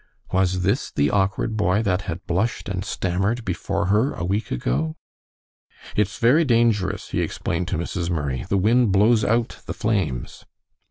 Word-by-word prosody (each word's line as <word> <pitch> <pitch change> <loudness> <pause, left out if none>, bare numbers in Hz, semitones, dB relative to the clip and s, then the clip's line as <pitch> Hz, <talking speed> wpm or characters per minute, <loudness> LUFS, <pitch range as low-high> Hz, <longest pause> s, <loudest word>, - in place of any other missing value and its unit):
Was 95 -1 +1
this 100 +9 0
the 70 0 +1
awkward 100 +2 0
boy 105 0 +2
that 95 -2 +1
had 90 +2 -5
blushed 100 +8 -1
and 95 -1 -3
stammered 100 +5 -1
before 85 -1 -2
her 115 +7 +2
a - - -4
week 100 +5 -1
ago? 70 +6 -1 1.0
"It's 105 0 0
very 130 +8 +4
dangerous," 115 -7 +1
he - - -1
explained 90 -1 -2
to 90 - -1
Mrs. 85 +1 -3
Murray, 70 -7 -2
"the 100 - +2
wind 110 +3 +3
blows 105 +3 +4
out 115 +3 0
the - - -4
flames." 95 - -2
95 Hz, 160 wpm, -23 LUFS, 90-110 Hz, 1.0 s, very